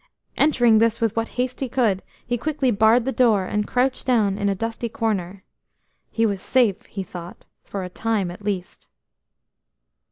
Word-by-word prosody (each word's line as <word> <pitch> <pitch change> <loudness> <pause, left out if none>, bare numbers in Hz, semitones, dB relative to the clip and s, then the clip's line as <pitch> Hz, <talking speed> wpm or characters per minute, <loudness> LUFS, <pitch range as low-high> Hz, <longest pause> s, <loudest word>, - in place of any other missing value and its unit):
Entering 240 -7 +4
this 230 0 +2
with 225 -2 0
what 225 0 0
haste 250 0 -1
he 265 - -2
could, 225 -7 +1 0.2
he 245 - -1
quickly 275 0 0
barred 220 +3 +4
the 265 - 0
door, 225 -7 +3
and 210 +2 -1
crouched 255 +1 0
down 215 -6 +3
in 200 0 0
a 195 - 0
dusty 230 +3 -3
corner. 200 -7 -2 0.7
He 225 - +1
was 200 -3 -1
safe, 240 -3 +1
he 195 - -5
thought, 175 -1 -10 0.2
for 195 -2 -5
a - - -4
time 210 -2 -1
at 180 - -11
least. 195 -3 -4
225 Hz, 170 wpm, -23 LUFS, 200-245 Hz, 0.7 s, Entering